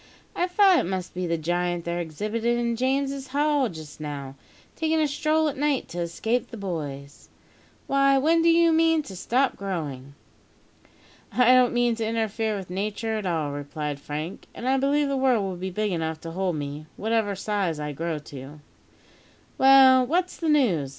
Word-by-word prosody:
"I 355 - +1
thought 370 -1 +5
it - - -1
must 185 -1 -4
be 180 0 -3
the 170 0 0
giant 175 +1 -1
they're 170 0 -2
exhibitin' 215 +9 -2
in 240 0 0
Saint - - -10
James's 275 +1 -1
Hall 285 -1 +1
just 155 -4 -10
now, 140 -3 -6 0.4
takin' 320 0 0
a 305 - +2
stroll 310 +2 +1
at 285 - -3
night 290 -2 0
to 175 - -6
escape 220 +8 -1
the 230 - -8
boys. 145 -8 -6 0.6
Why, 275 0 +3
when 325 +5 +3
do 335 - +4
you 335 0 +5
mean 325 -1 +3
to 195 - -10
stop 250 +8 +1
growing?" 145 -8 -5 1.2
"I 250 0 +5
don't 255 -1 +5
mean 240 -1 +2
to 225 - -2
interfere 220 -1 -1
with 185 -2 -8
Nature 215 +4 -2
at 200 - -4
all," 160 -4 -1
replied 145 0 -5
Frank; 150 +5 -6
"and 245 - -5
I 265 +1 +3
believe 285 +2 +2
the 275 - -1
world 255 -5 +2
will 190 -1 -3
be 185 +2 -4
big 210 +2 -2
enough 160 -2 -2
to 165 - -7
hold 185 0 -1
me, 145 +1 -6
whatever 220 -2 0
size 195 -5 -2
I 150 0 -3
grow 165 +2 -3
to." 145 0 -10 1.0
"Well, 265 -1 +7
what's 355 +5 0
the 330 - -2
news?" 205 - +2
210 Hz, 185 wpm, -25 LUFS, 165-270 Hz, 1.2 s, Well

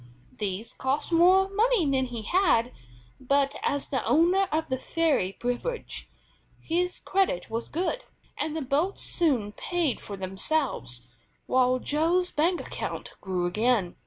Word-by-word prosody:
These 205 +1 -3
cost 270 +6 -2
more 365 +3 +6
money 425 -1 +2
than 265 -2 +2
he 235 -3 -5
had, 285 - +3 0.5
but, 275 +1 +1
as 285 -1 -1
the 265 - -1
owner 360 +5 +3
of 315 +1 0
the 260 -1 -2
ferry 300 - +1
privilege, 245 - -3 0.5
his 360 +2 -1
credit 375 - 0
was 230 +1 -3
good, 370 +10 -2 0.3
and 315 0 -2
the 310 - -2
boats 295 +9 0
soon 260 - +1
paid 335 +3 -1
for 200 - -7
themselves, 190 - -2 0.4
while 255 0 +3
Joe's 330 +7 +1
bank 340 +4 +2
account - - -5
grew 185 -2 -1
again. 210 0 +1
285 Hz, 135 wpm, -27 LUFS, 235-350 Hz, 0.5 s, more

